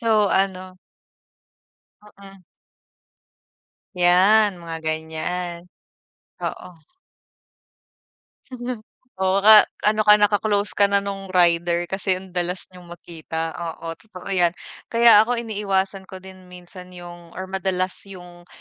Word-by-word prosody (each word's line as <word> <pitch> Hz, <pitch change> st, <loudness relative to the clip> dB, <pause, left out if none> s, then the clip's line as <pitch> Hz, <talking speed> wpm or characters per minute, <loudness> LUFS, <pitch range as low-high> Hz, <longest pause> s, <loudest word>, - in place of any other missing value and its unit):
so, 230 Hz, -, 0 dB, 0.2 s
ano 185 Hz, -1 st, -2 dB, 1.4 s
Mm. 195 Hz, -1 st, -15 dB, 1.5 s
'Yan, 190 Hz, +3 st, +4 dB
mga 165 Hz, -1 st, -8 dB
ganiyan. 170 Hz, +3 st, -4 dB, 0.7 s
Oo. 165 Hz, -4 st, -7 dB, 2.3 s
Oo 190 Hz, +1 st, +1 dB
nga, 215 Hz, 0 st, +8 dB, 0.2 s
ano 215 Hz, 0 st, +1 dB
ka, 210 Hz, -, +9 dB
naka-close 205 Hz, 0 st, +1 dB
ka 200 Hz, -1 st, +3 dB
na 200 Hz, 0 st, +1 dB
nung 195 Hz, -1 st, -6 dB
rider 175 Hz, -1 st, +2 dB
kasi 190 Hz, +1 st, -2 dB
ang 185 Hz, 0 st, -10 dB
dalas 180 Hz, +1 st, -3 dB
niyong 180 Hz, -1 st, -15 dB
makita, 165 Hz, -1 st, -6 dB
oo, 165 Hz, -1 st, -7 dB
totoo 195 Hz, -3 st, -11 dB
'yan. 175 Hz, -2 st, +2 dB, 0.3 s
Kaya 230 Hz, -2 st, +6 dB
ako 240 Hz, +3 st, +2 dB
iniiwasan 195 Hz, -4 st, -2 dB
ko 190 Hz, 0 st, -11 dB
din 185 Hz, -1 st, -14 dB
minsan 180 Hz, 0 st, -13 dB
yung 175 Hz, -1 st, -12 dB
or 185 Hz, -, -5 dB
madalas 190 Hz, -1 st, -1 dB, 0.2 s
yung 175 Hz, -2 st, -13 dB
185 Hz, 110 wpm, -22 LUFS, 175-200 Hz, 2.3 s, ka